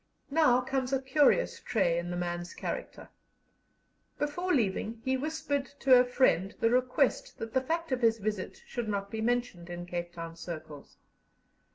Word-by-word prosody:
Now 275 -5 +4
comes 260 0 -2
a 270 - +3
curious 290 - +3
trait 170 0 +1
in 175 0 -4
the 175 - -3
man's 175 0 -3
character. - - -5 1.1
Before 350 +5 -1
leaving 225 - 0
he 260 0 +2
whispered 290 0 -2
to 265 - +5
a 250 0 +8
friend 245 -6 +2
the 230 - +3
request 255 +3 +1
that 225 0 -6
the 260 - +3
fact 330 +3 -2
of 255 -1 0
his 225 -1 +4
visit 210 -2 -4
should 235 -3 -4
not 200 -1 -2
be 220 - -3
mentioned 235 -7 -1
in 175 0 -5
Cape 175 -1 -4
Town 165 -1 -7
circles. 155 -4 -8
240 Hz, 165 wpm, -30 LUFS, 175-265 Hz, 1.1 s, a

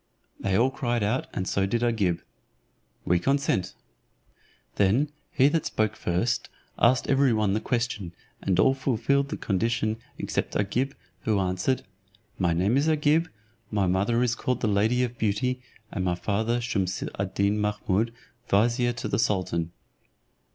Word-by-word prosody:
They 95 -1 +1
all 130 +4 +3
cried 120 -4 -1
out, 110 +6 0
and 95 - -3
so 100 -1 +1
did 115 +4 0
Agib, 105 -8 +1 0.8
"We 90 0 +3
consent." 135 - 0 1.0
Then 115 +10 +3 0.2
he 135 - +4
that 160 0 0
spoke 110 0 0
first 95 +4 -1 0.3
asked 125 +2 +4
every 135 -1 +4
one 105 -3 +1
the 110 - +1
question, 115 -9 -2 0.3
and 95 -2 +1
all 135 - +5
fulfilled 135 +1 +1
the 160 - -3
condition 110 +2 0 0.2
except - - -2
Agib, 125 +7 0 0.3
who 110 0 +1
answered, 95 +7 0 0.6
"My 90 -3 +2
name 95 +9 +2
is 145 +3 +2
Agib, 155 +2 +3 0.4
my 105 -3 +1
mother 100 +7 +2
is 120 -2 +1
called 125 0 -2
the 110 - +1
lady 110 +5 +2
of 120 -1 -4
beauty, 125 +4 0 0.3
and 95 - -2
my 90 -1 +1
father 110 +6 0
Shumse 100 -6 -1
ad 100 -1 -2
Deen 100 +1 +2
Mahummud, 105 +1 0 0.4
vizier 120 +4 +3
to 120 - -4
the - - 0
sultan." 90 -6 0
110 Hz, 150 wpm, -26 LUFS, 95-125 Hz, 1.0 s, all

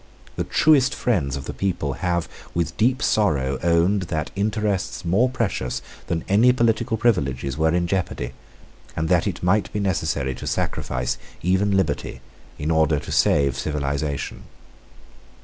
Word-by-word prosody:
The - - -2
truest 145 -4 +4
friends 85 - 0
of 70 -1 -6
the - - -5
people 85 -8 -1
have 85 +3 -1 0.3
with 85 -2 -1
deep 125 +4 +2
sorrow 70 -11 +1
owned 85 +4 +3
that 80 -2 -2
interests 105 -3 -1
more 100 +9 +3
precious 95 - -2 0.2
than 80 -1 -2
any 110 +6 +5
political 115 -1 +1
privileges 70 - 0
were 80 +1 +2
in 85 +2 +1
jeopardy, 85 -9 -2 0.6
and 80 0 -1
that 90 +1 +3
it 90 -3 -4
might 100 +3 +2
be 105 - -2
necessary 80 -9 0
to - - -7
sacrifice 60 -1 -2 0.2
even 95 +3 +2
liberty 80 -7 -1 0.4
in 75 +3 -2
order 80 -1 +3
to 70 - -6
save 70 -2 +3
civilisation. 70 -1 -3
85 Hz, 145 wpm, -23 LUFS, 70-105 Hz, 0.6 s, any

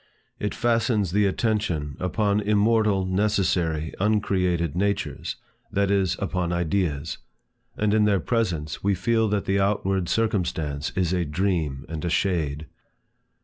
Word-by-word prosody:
It 105 - -2
fastens 115 -5 +1
the 100 +1 +3
attention 95 - -1
upon 100 +2 +1
immortal 105 -1 +2
necessary 95 -5 0
uncreated 90 -6 +1
natures, 100 +2 -1 0.4
that 100 0 +1
is, 95 -3 +2
upon 90 -3 -2
Ideas; 85 -3 -1 0.6
and 105 -1 +1
in 110 -1 +4
their 100 -2 +3
presence, 85 -7 -1
we 100 0 +2
feel 110 +4 +1
that 100 -1 0
the 95 +1 +1
outward 95 -2 0
circumstance 80 -9 -1
is 90 -1 +1
a 90 -1 +1
dream 80 -4 -1
and 80 -1 -5
a 85 - -1
shade. 80 -5 0
95 Hz, 130 wpm, -25 LUFS, 85-105 Hz, 0.6 s, in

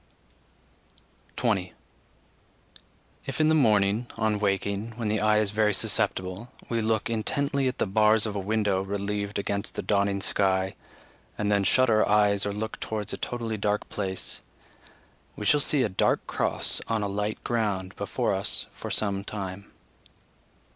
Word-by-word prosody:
20. 100 -7 0 1.5
If - - -4
in 155 0 +4
the - - +4
morning, 110 -5 +3
on 110 -1 +1
waking, 100 +2 -1
when 115 -2 -2
the 110 0 +1
eye 110 0 +4
is 105 -2 +2
very 105 -1 +2
susceptible, 105 0 -1 0.2
we 115 -1 0
look 110 -1 0
intently 135 +4 0
at 130 - -2
the - - +1
bars 105 +2 +4
of 105 -2 -3
a - - -1
window 100 -1 +1
relieved 100 +1 -3
against 100 +1 -3
the - - -3
dawning 100 -1 +1
sky, 95 -1 +1 0.6
and 105 0 0
then 100 -1 +3
shut 130 +6 +4
our 110 -2 +3
eyes 105 -1 +3
or - - -1
look 110 +2 -4
towards 105 -2 -3
a - - -3
totally 115 -3 -3
dark 105 0 -1
place, 95 -1 -4 0.9
we 105 - -6
shall 150 - +5
see 140 -1 +3
a - - +2
dark 95 - +1
cross - - 0
on 110 -2 0
a - - 0
light 105 +2 -3
ground 100 -5 -1
before - - -1
us - - -1
for - - -8
some 100 -2 0
time. 100 -1 -6
105 Hz, 155 wpm, -27 LUFS, 100-110 Hz, 1.5 s, shall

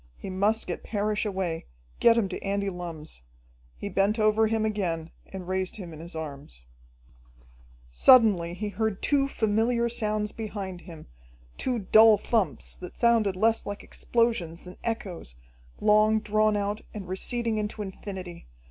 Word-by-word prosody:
He 190 - -7
must 205 +4 +1
get 175 - -4
Parrish 210 0 -1
away, 185 -5 -3 0.3
get 230 0 +6
him 220 -4 +2
to 180 - -5
Andy 200 0 -1
Lumm's. 165 - -8 0.6
He - - -5
bent 200 +3 +1
over 215 0 +3
him 220 0 0
again 170 -7 -2 0.2
and 185 -2 -8
raised 185 0 -1
him 180 -6 -7
in 155 - -10
his 170 +1 -8
arms. 140 - -8 1.3
Suddenly 180 - +5
he 210 +3 -3
heard 215 0 -2
two 275 -1 +3
familiar 235 0 +1
sounds 215 -2 -1
behind 200 -5 -6
him, 165 -4 -11 0.5
two 255 -2 -1
dull 220 +1 +6
thumps 220 -3 -1
that 180 - -10
sounded 230 -5 +3
less 225 +4 +1
like 205 0 -5
explosions 225 -9 -1
than 180 - -10
echoes, 190 - -4 0.4
long 215 +1 +4
drawn 215 0 +2
out, 205 +1 -2
and 200 -4 -6
receding 225 +4 -1
into 210 0 -3
infinity. 185 -3 -8
205 Hz, 150 wpm, -27 LUFS, 180-220 Hz, 1.3 s, get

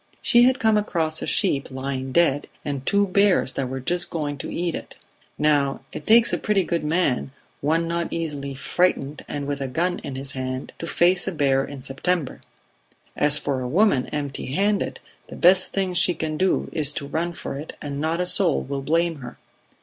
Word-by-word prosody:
She 240 0 +5
had 260 +1 +3
come 220 -4 +3
across 165 -7 0
a - - -4
sheep 150 -9 +1
lying 130 0 -4
dead, 145 -3 +2 0.2
and 140 -2 -3
two 200 0 +3
bears 200 -7 +2
that 130 -2 -2
were 130 +1 -4
just 175 +7 -1
going 150 -3 -3
to - - -5
eat 175 -1 -2
it. - - -7 0.4
Now 145 -2 +1
it - - -8
takes 230 +1 +6
a - - 0
pretty 210 -3 +1
good 170 -2 -2
man, 150 -5 0 0.3
one 165 +3 +1
not 170 0 -1
easily 145 -4 -4
frightened 150 0 0
and 145 -1 -4
with 140 0 -3
a 135 - -2
gun 170 +7 -1
in 135 - -7
his 135 +1 -2
hand, 130 -1 -4
to 165 - -5
face 175 +2 +3
a - - 0
bear 135 -5 +2
in 140 -2 -8
September; 140 +3 -2 0.7
as 150 0 +4
for 140 -3 -2
a 125 - -3
woman 160 - +2
empty 145 -2 -4
handed, 200 +10 0 0.3
the - - -9
best 185 +1 +4
thing 190 -2 -1
she 180 0 +3
can 155 0 -3
do 185 +4 +1
is 150 -3 +1
to 140 - -5
run 165 +4 -2
for 170 - -6
it 145 +3 -7
and 140 -1 -5
not 160 +2 -1
a 180 - +1
soul 180 -3 +3
will 140 0 -4
blame 165 +3 +1
her. 125 -3 -9
155 Hz, 200 wpm, -23 LUFS, 140-180 Hz, 0.7 s, takes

